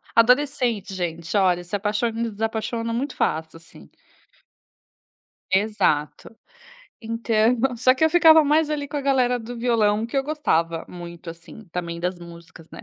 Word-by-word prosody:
Adolescente, 245 Hz, -4 st, +2 dB
gente, 170 Hz, -1 st, -4 dB
olha, 180 Hz, -3 st, +2 dB
se 185 Hz, -, -4 dB
apaixona 210 Hz, +3 st, -1 dB
e 230 Hz, -1 st, -2 dB
desapaixona 225 Hz, +2 st, -3 dB
muito 260 Hz, +4 st, -3 dB
fácil 160 Hz, +1 st, -2 dB
assim. 165 Hz, -, -16 dB, 1.6 s
Exato. 195 Hz, -3 st, 0 dB, 0.6 s
Então, 230 Hz, 0 st, +1 dB, 0.2 s
só 255 Hz, +2 st, +4 dB
que 270 Hz, -, +1 dB
eu 320 Hz, -, +3 dB
ficava 320 Hz, -2 st, +7 dB
mais 305 Hz, +1 st, +2 dB
ali 290 Hz, -2 st, -3 dB
com 295 Hz, -, -5 dB
a -, -, -1 dB
galera 255 Hz, -3 st, +1 dB
do 240 Hz, +1 st, -8 dB
violão 225 Hz, -3 st, +1 dB
que 235 Hz, -, -6 dB
eu 270 Hz, -, +1 dB
gostava 170 Hz, -, -1 dB
muito 170 Hz, -1 st, -9 dB
assim, 170 Hz, +6 st, -13 dB
também, 170 Hz, -1 st, -5 dB
das 180 Hz, +1 st, -2 dB
músicas, 170 Hz, -1 st, -13 dB
né. -, -, -11 dB
220 Hz, 150 wpm, -23 LUFS, 175-250 Hz, 1.6 s, ficava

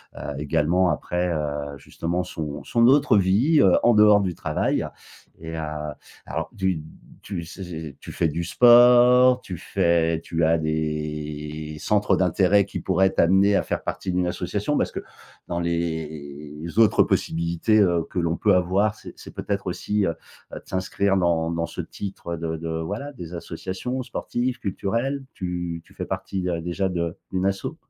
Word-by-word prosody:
heu, 75 Hz, -, -5 dB
également 85 Hz, +5 st, +2 dB
après, 90 Hz, +1 st, -1 dB
heu, 75 Hz, -2 st, -3 dB
justement 85 Hz, +6 st, -3 dB
son 75 Hz, -5 st, -6 dB
son 115 Hz, 0 st, +3 dB
autre 135 Hz, -5 st, +5 dB
vie, 110 Hz, -, +3 dB
heu, 95 Hz, -, +5 dB
en 120 Hz, -, +5 dB
dehors 105 Hz, -1 st, +6 dB
du 90 Hz, -3 st, -2 dB
travail 75 Hz, -1 st, -1 dB, 0.5 s
et 80 Hz, 0 st, -7 dB
heu, -, -, -2 dB, 0.6 s
alors -, -, -4 dB
tu 95 Hz, -5 st, 0 dB, 0.4 s
tu 90 Hz, -4 st, -5 dB
zai 95 Hz, +4 st, -9 dB
zai 80 Hz, -5 st, -7 dB
tu -, -, -9 dB
fais 85 Hz, -2 st, +1 dB
du 85 Hz, +3 st, -3 dB
sport, 125 Hz, +4 st, +6 dB
tu 90 Hz, -3 st, -7 dB
fais 85 Hz, 0 st, +1 dB
tu 80 Hz, -1 st, 0 dB
as 80 Hz, +1 st, +3 dB
des 75 Hz, -1 st, -3 dB
centres 105 Hz, -1 st, +2 dB
d'intérêt 95 Hz, +2 st, +3 dB
qui -, -, -6 dB
pourraient 95 Hz, +2 st, +3 dB
t'amener 95 Hz, +3 st, +4 dB
à -, -, +1 dB
faire -, -, -3 dB
partie 95 Hz, -, -3 dB
d'une 90 Hz, 0 st, +1 dB
association? 105 Hz, +10 st, -2 dB
Parce -, -, 0 dB
que -, -, -4 dB, 0.5 s
dans 85 Hz, 0 st, -1 dB
les 80 Hz, -2 st, -4 dB
autres 110 Hz, -, +6 dB
possibilités, 85 Hz, +6 st, +1 dB
heu, 85 Hz, -3 st, +2 dB
que 90 Hz, -, -2 dB
l'on 85 Hz, 0 st, 0 dB
peut 100 Hz, -3 st, +3 dB
avoir, 95 Hz, +4 st, +2 dB
c'est -, -, -11 dB
c'est -, -, -10 dB
peut-être -, -, -3 dB
aussi, 105 Hz, -1 st, -1 dB
heu 85 Hz, -, +1 dB, 0.4 s
heu, -, -, -5 dB
de -, -, -20 dB
s'inscrire 95 Hz, +1 st, 0 dB
dans 85 Hz, -2 st, +1 dB
dans 85 Hz, 0 st, -1 dB
ce -, -, -5 dB
titre 95 Hz, -4 st, -6 dB
de 80 Hz, 0 st, -3 dB
de 80 Hz, 0 st, -4 dB
voilà, 105 Hz, -, -5 dB
des 90 Hz, -8 st, -9 dB
associations 95 Hz, +9 st, -4 dB
sportives, 125 Hz, +1 st, -3 dB
culturelles. 115 Hz, +8 st, -2 dB
Tu 90 Hz, -2 st, -4 dB
tu -, -, -20 dB
fais -, -, -4 dB
partie, 95 Hz, -2 st, -3 dB
heu, 85 Hz, -1 st, -2 dB
déjà 90 Hz, +3 st, -1 dB
de 85 Hz, -2 st, -3 dB
d'une 95 Hz, 0 st, -1 dB
asso? 95 Hz, 0 st, -2 dB
90 Hz, 170 wpm, -24 LUFS, 80-100 Hz, 0.6 s, dehors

